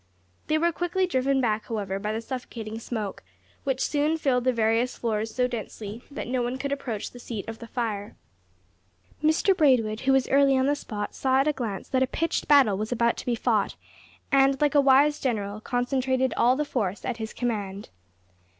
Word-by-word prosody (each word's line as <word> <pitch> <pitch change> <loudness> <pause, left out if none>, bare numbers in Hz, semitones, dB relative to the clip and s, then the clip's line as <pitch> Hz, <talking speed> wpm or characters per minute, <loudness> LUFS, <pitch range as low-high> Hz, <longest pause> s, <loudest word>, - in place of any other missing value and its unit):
They 310 - +2
were 340 +2 +2
quickly 350 +3 0
driven 270 -4 +1
back, 220 -3 0
however, 200 -4 -3
by 210 +1 -2
the 220 +1 -2
suffocating 230 -3 -6
smoke, 220 -4 -4 0.4
which 265 -1 0
soon 300 +2 +1
filled 255 -5 +1
the 255 - +4
various 230 +1 +1
floors 220 -1 -1
so 250 -1 +2
densely 220 -2 -6
that 285 - -6
no 250 0 0
one 245 +2 -2
could 280 +1 -3
approach 245 -7 -3
the 245 - -12
seat 225 -4 -6
of 225 0 -7
the 230 - -9
fire. 215 -4 -3 1.1
Mr 315 +5 +3
Braidwood, 245 -9 +3
who 265 +2 +1
was 270 -1 +3
early 275 0 +4
on 260 - +2
the 285 - +3
spot, 210 -7 -5
saw 265 0 +2
at 280 - 0
a 300 - +3
glance 225 -8 -4
that 260 -1 +1
a 260 - +3
pitched 330 +6 -2
battle 265 -10 +5
was 215 +2 -3
about 235 -1 +2
to - - -8
be 240 - +2
fought, - - 0 0.6
and, 270 -1 +4
like 295 -1 +2
a 290 - +6
wise 280 +2 +4
general, 210 -4 -2
concentrated 260 +2 0
all 245 +2 +4
the 300 +2 -1
force 205 -9 -2
at 245 -3 -2
his 220 -1 -5
command. 205 -5 -3
250 Hz, 195 wpm, -26 LUFS, 220-275 Hz, 1.1 s, a